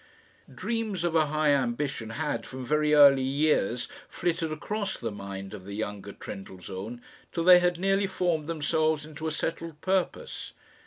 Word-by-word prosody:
Dreams 220 -6 -2
of 170 -1 0
a 155 -2 +4
high 155 0 +2
ambition 130 -3 0
had, 115 0 -2
from 130 -1 -7
very 150 +2 +3
early 140 -2 +8
years, 135 -4 +1 0.2
flitted 165 -2 -1
across 200 +6 -3
the 115 -2 -3
mind 100 -1 -7
of 100 -3 -8
the 100 +1 -7
younger 105 -2 -4
Trendellsohn 95 +4 -8 0.3
till 165 - -1
they 180 0 +9
had 180 -1 +1
nearly 195 +2 +2
formed 175 -5 0
themselves 155 -1 +1
into 155 +1 -6
a - - -1
settled 165 0 -3
purpose. 190 - -1
150 Hz, 155 wpm, -28 LUFS, 120-170 Hz, 0.3 s, they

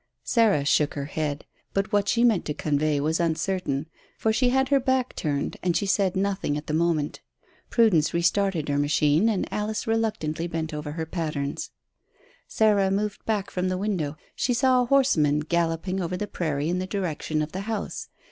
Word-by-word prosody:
Sarah 215 - +3
shook 145 +1 +2
her 140 -1 -3
head; 145 -1 -3 0.3
but 195 +1 0
what 205 -1 +2
she 235 - +3
meant 225 -7 +4
to 150 - -3
convey 150 0 0
was 155 +4 0
uncertain, 165 -3 -1 0.3
for 220 - +1
she 245 +3 +3
had 265 +1 +2
her 280 - +4
back 260 -1 0
turned 145 -2 -2
and 175 -2 +1
she 200 - -1
said 195 -1 +1
nothing 190 -6 0
at 150 - -6
the 150 - -4
moment. 160 -2 0 0.5
Prudence 205 -10 +3
restarted 170 -1 +1
her 145 -1 0
machine 150 +6 +3
and 210 -4 0
Alice 210 0 -2
reluctantly 210 -8 -1
bent 160 -1 -3
over 150 0 -5
her 160 0 -3
patterns. 155 -4 -3 0.8
Sarah 205 -3 +3
moved 205 +1 -2
back 210 -3 -1
from 185 0 -1
the 185 - -1
window. 180 -7 -2 0.2
She 245 - 0
saw 255 0 +4
a - - +1
horseman 165 - +3
galloping 170 +3 -1
over 180 +1 -2
the 210 - -2
prairie 155 -7 -2
in 180 +1 0
the 185 - -3
direction 160 -5 -2
of 150 - -6
the 190 - -4
house. 220 -2 -4
175 Hz, 185 wpm, -25 LUFS, 155-210 Hz, 0.8 s, meant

